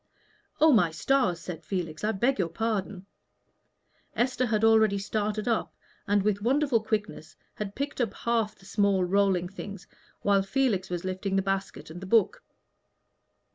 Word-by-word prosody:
"Oh, 315 +1 +6
my 210 - +4
stars!" 185 - +1
said 170 -1 -7
Felix, 165 -4 -4
"I 215 - +2
beg 235 +4 +1
your 175 -3 0
pardon." 200 -1 -3 1.1
Esther 255 +1 +1
had 215 -1 0
already 220 -2 +5
started 210 +2 -2
up, 230 -2 -1 0.3
and 205 -1 +2
with 205 -1 0
wonderful 260 0 +2
quickness 210 -7 -4 0.2
had 205 -1 -6
picked 280 -1 -3
up 230 -5 -1
half 230 -3 -1
the 195 - -20
small 200 -2 +2
rolling 190 -1 +2
things 195 0 -8 0.4
while 200 -1 +4
Felix 195 -3 0
was 175 0 -4
lifting 190 +1 -2
the 195 - +2
basket 195 -4 -3
and 175 +3 -9
the 190 - -7
book. 220 -1 +3
205 Hz, 155 wpm, -27 LUFS, 190-225 Hz, 1.1 s, Oh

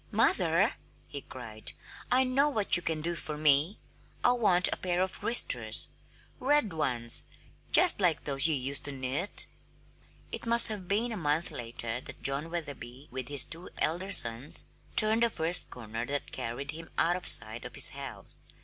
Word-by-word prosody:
"Mother!" - - 0 0.3
he 140 - -10
cried. 115 -5 -11 0.4
"I 255 +1 +2
know 270 +3 0
what 215 -8 +3
you 175 - 0
can 160 -2 -4
do 170 +2 -4
for 155 -2 -7
me. 150 +6 +1 0.5
I - - +3
want 200 -7 +5
a - - -6
pair 180 -1 -4
of 185 0 -4
wristers 240 - +3 0.5
red 275 - -1
ones, 120 -7 +4 0.5
just 360 - +5
like 170 -5 0
those 140 +1 -2
you 160 - -2
used 135 +1 -1
to 145 - -2
knit!" 135 +8 0 0.9
It - - -8
must 235 0 +6
have 205 -4 -7
been 220 +5 -2
a 220 - -6
month 155 0 -3
later 115 0 -7
that - - -14
John 140 +4 -2
Wetherby, 145 -5 -9
with 130 -1 -6
his 145 -2 +3
two 165 +5 -6
elder 180 +5 -3
sons, 120 - +2 0.3
turned 215 +2 +4
the 235 - +1
first 165 -3 +1
corner 115 -1 -9
that 145 0 -5
carried 130 +5 -6
him 165 +1 -12
out 175 +1 0
of 180 - -3
sight 110 +2 +6
of - - -11
his - - +7
house. - - -12
160 Hz, 175 wpm, -27 LUFS, 135-195 Hz, 0.9 s, his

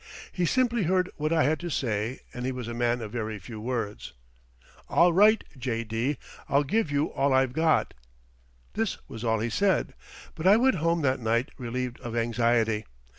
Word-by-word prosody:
He 180 -2 0
simply 240 +2 +2
heard 185 +1 +1
what 155 0 -1
I 165 -1 +3
had 155 +4 +1
to 175 - -5
say 115 -4 -2
and 125 - -5
he 130 - -1
was 125 -3 -6
a 120 - -4
man 120 0 0
of 105 - -7
very 110 -2 -3
few 110 +1 -9
words. 115 -3 -4 0.8
"All 175 0 +4
right, 210 +4 +5
J.D., 115 +1 -2 0.3
I'll 140 +1 +3
give 190 +5 0
you 145 +1 0
all 140 0 +2
I've 130 -1 +2
got." 160 +2 +2 0.8
This 220 -2 -1
was 115 -3 -8
all 110 -1 +2
he 115 +1 -2
said, 195 - +1 0.4
but 165 +3 -2
I 200 +3 +7
went 255 -3 +3
home 165 0 +1
that 130 -1 +1
night 115 +2 0
relieved 125 0 -4
of 120 -1 -6
anxiety. 115 -2 +1
130 Hz, 180 wpm, -27 LUFS, 115-165 Hz, 0.8 s, I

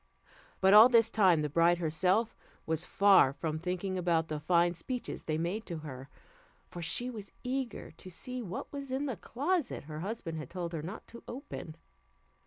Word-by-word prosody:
But 190 +1 +6
all 220 +4 +10
this 230 -2 +4
time 180 -7 +4
the - - 0
bride 170 +4 +3
herself 180 +7 +1 0.3
was 160 +2 -1
far 195 -8 +5
from 155 +1 -3
thinking 185 +2 -2
about 170 -2 +1
the 155 -1 -3
fine 170 +2 +3
speeches 245 +9 -5
they 155 -1 -1
made 175 +7 -2
to 170 - -4
her, 135 -1 -8 0.6
for 175 - -7
she 245 +9 0
was 210 -4 -9
eager 255 -1 -3
to 185 - -12
see 250 +8 -5
what 185 +3 -6
was 280 -1 -6
in 270 +2 -1
the 260 -5 -2
closet 295 +3 -2
her 150 +1 -7
husband 175 -4 -4
had 155 - -7
told 170 -1 -5
her 160 - -3
not 185 +8 -7
to 235 - -11
open. 245 - -7
180 Hz, 185 wpm, -31 LUFS, 165-230 Hz, 0.6 s, all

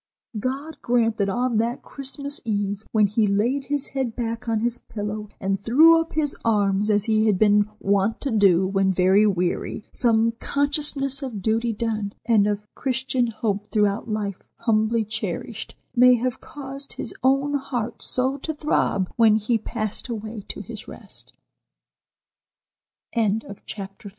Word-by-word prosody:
God 275 +6 -4
grant 230 -2 +2
that 200 -2 +1
on 245 +2 0
that 235 +3 -1
Christmas 280 +1 -4
Eve, 205 -2 -2
when 215 -2 +4
he 210 +2 +2
laid 235 +8 +1
his 290 -1 -2
head 260 -4 -2
back 230 -1 -3
on 220 -1 +1
his 240 +1 0
pillow 210 0 -5
and 195 -2 -1
threw 320 +9 +6
up 325 - -7
his 295 -2 0
arms 205 -2 +2
as 205 -1 +3
he 220 -1 +2
had 205 -3 +3
been 210 0 +4
wont 200 +2 +1
to 275 - -2
do 195 -4 +4
when 195 0 +2
very 190 +3 +4
weary, 180 +2 -1
some 230 -1 +3
consciousness 285 -1 -1
of 230 -8 -5
duty 230 +2 +1
done, 215 -2 -2
and 220 -3 +4
of 210 0 -2
Christian 260 -1 -1
hope 210 -2 -2
throughout 205 +1 +1
life 205 -3 -3 0.2
humbly 220 0 +2
cherished, 215 +1 -5 0.2
may 250 0 +7
have 245 +1 -2
caused 275 -1 -8
his - - -6
own 275 +3 +2
heart 245 -5 -3
so 260 +2 +1
to 315 +3 -5
throb 290 -10 +1
when 225 -2 +6
he 220 +2 +1
passed 215 +1 -4
away 220 -1 -5
to - - -5
his - - -9
rest." - - -11 2.4
CHAPTER 200 +2 -8
IV. - - -6
225 Hz, 155 wpm, -24 LUFS, 205-255 Hz, 2.4 s, may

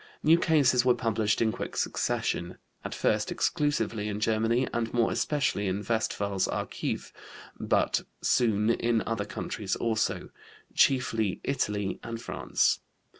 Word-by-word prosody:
New 165 +2 +6
cases 140 -7 +4
were 125 -1 +4
published 110 -3 +1
in 110 - +2
quick - - -6
succession, 90 +1 -1 0.3
at - - -5
first - - +1
exclusively 145 -8 0
in 105 0 -3
Germany, 115 +4 +1
and 115 -1 -1
more 115 -1 +3
especially 140 -9 0
in 95 +2 -2
Westphal's 100 -4 0
Archiv, - - -3 0.5
but - - +1 0.2
soon 110 -2 +2
in 115 -1 +1
other 115 -2 -2
countries 105 -1 -3
also, 110 -2 -1 0.4
chiefly 115 -7 +2
Italy 105 -7 -1
and 115 -1 -6
France. - - 0
115 Hz, 125 wpm, -28 LUFS, 105-120 Hz, 0.5 s, New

